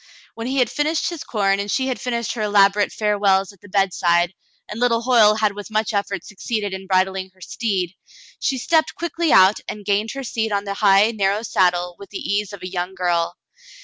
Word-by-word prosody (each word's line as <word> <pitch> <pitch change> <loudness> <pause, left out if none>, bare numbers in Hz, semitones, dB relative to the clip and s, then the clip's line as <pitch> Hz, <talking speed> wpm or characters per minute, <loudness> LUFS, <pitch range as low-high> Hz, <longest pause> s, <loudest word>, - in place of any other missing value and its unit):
When 230 +1 -6
he 265 +2 -2
had 250 -4 +2
finished 310 +3 0
his 330 -2 -6
corn 200 -8 0
and 200 +1 -3
she 260 +5 0
had 260 - -3
finished 235 -3 -2
her 230 - -5
elaborate 205 -1 +3
farewells 200 -2 +1
at 195 - -24
the 205 - -15
bedside, 175 -3 +1 0.3
and 210 - -7
little 235 -1 +2
Hoyle 225 -4 +5
had 215 -2 +1
with 205 +1 -8
much 215 +1 -1
effort 200 -3 -2
succeeded 210 0 -4
in 190 0 -7
bridling 190 0 0
her - - -26
steed, 190 -3 -2 0.5
she 270 - 0
stepped 315 +5 +1
quickly 340 -1 -1
out 190 +2 +6
and 210 -1 -7
gained 205 +2 +1
her 275 - -5
seat 225 -3 -2
on 200 -1 0
the 200 -1 -4
high, 200 +1 +4
narrow 205 0 0
saddle 180 -4 +1
with 200 - -11
the 200 - -6
ease 205 0 -2
of 200 -3 -10
a - - -4
young 180 0 -4
girl. 175 -2 0
205 Hz, 210 wpm, -21 LUFS, 190-230 Hz, 0.5 s, out